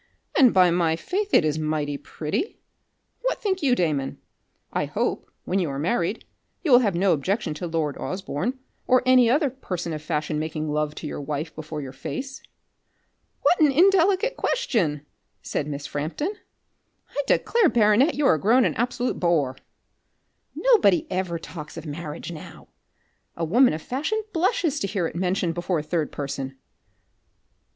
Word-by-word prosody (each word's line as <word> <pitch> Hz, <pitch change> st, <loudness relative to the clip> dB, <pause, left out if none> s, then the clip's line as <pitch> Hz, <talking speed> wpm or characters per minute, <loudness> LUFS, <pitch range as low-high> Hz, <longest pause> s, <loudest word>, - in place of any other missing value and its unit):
And 255 Hz, -5 st, +6 dB
by 180 Hz, -2 st, +5 dB
my 170 Hz, -2 st, +2 dB
faith, 395 Hz, -, -3 dB
it 155 Hz, -, +5 dB
is 155 Hz, 0 st, 0 dB
mighty 155 Hz, -2 st, -1 dB
pretty. 155 Hz, -, -4 dB, 0.6 s
What -, -, -1 dB
think 380 Hz, -4 st, -1 dB
you 265 Hz, -4 st, +3 dB
Damon? 150 Hz, -, -1 dB, 0.6 s
I -, -, 0 dB
hope, -, -, -2 dB
when 190 Hz, -, 0 dB
you 175 Hz, -5 st, 0 dB
are 135 Hz, -, -4 dB
married, 175 Hz, +6 st, -1 dB, 0.4 s
you 315 Hz, -, +1 dB
will 245 Hz, -, +9 dB
have 205 Hz, -7 st, +1 dB
no 185 Hz, +1 st, +3 dB
objection 185 Hz, +5 st, -1 dB
to 160 Hz, +4 st, -5 dB
lord 160 Hz, -3 st, -2 dB
Osborne, 190 Hz, -, -3 dB, 0.3 s
or 255 Hz, 0 st, +4 dB
any 255 Hz, -2 st, +6 dB
other 280 Hz, +2 st, +2 dB
person 180 Hz, -10 st, -5 dB
of 155 Hz, -, -5 dB
fashion 155 Hz, -1 st, -2 dB
making 155 Hz, 0 st, -3 dB
love 150 Hz, 0 st, -1 dB
to -, -, -7 dB
your 150 Hz, -, -4 dB
wife 150 Hz, +3 st, -4 dB
before 155 Hz, -1 st, -6 dB
your 130 Hz, -1 st, -8 dB
face." 270 Hz, -, -6 dB, 1.0 s
"What 360 Hz, -, +4 dB
an 300 Hz, -3 st, +5 dB
indelicate 385 Hz, -, +4 dB
question!" 175 Hz, -, 0 dB, 0.4 s
said 145 Hz, -, -2 dB
Miss 145 Hz, -1 st, -5 dB
Frampton. 160 Hz, -, -3 dB, 0.8 s
"I 285 Hz, -, -1 dB
declare, 460 Hz, -7 st, +3 dB
baronet, 230 Hz, +7 st, +4 dB
you 295 Hz, -, 0 dB
are 160 Hz, -12 st, +4 dB
grown 240 Hz, -, +4 dB
an -, -, +1 dB
absolute 245 Hz, +1 st, -1 dB
boor. 155 Hz, -7 st, +1 dB, 1.0 s
Nobody 435 Hz, -, +4 dB
ever 185 Hz, -2 st, -1 dB
talks 155 Hz, -2 st, -9 dB
of -, -, -7 dB
marriage 150 Hz, +2 st, -6 dB
now. 160 Hz, -, -11 dB, 0.7 s
A 165 Hz, -, -1 dB
woman 245 Hz, +10 st, +5 dB
of 155 Hz, -, -5 dB
fashion 320 Hz, -, -2 dB
blushes 345 Hz, -, +1 dB
to 195 Hz, -, -1 dB
hear 195 Hz, -3 st, -1 dB
it 165 Hz, -, -4 dB
mentioned 180 Hz, -1 st, 0 dB
before 175 Hz, +1 st, -1 dB
a 150 Hz, -, -2 dB
third 155 Hz, -1 st, -1 dB
person." 135 Hz, -1 st, -5 dB
180 Hz, 160 wpm, -24 LUFS, -, 1.0 s, will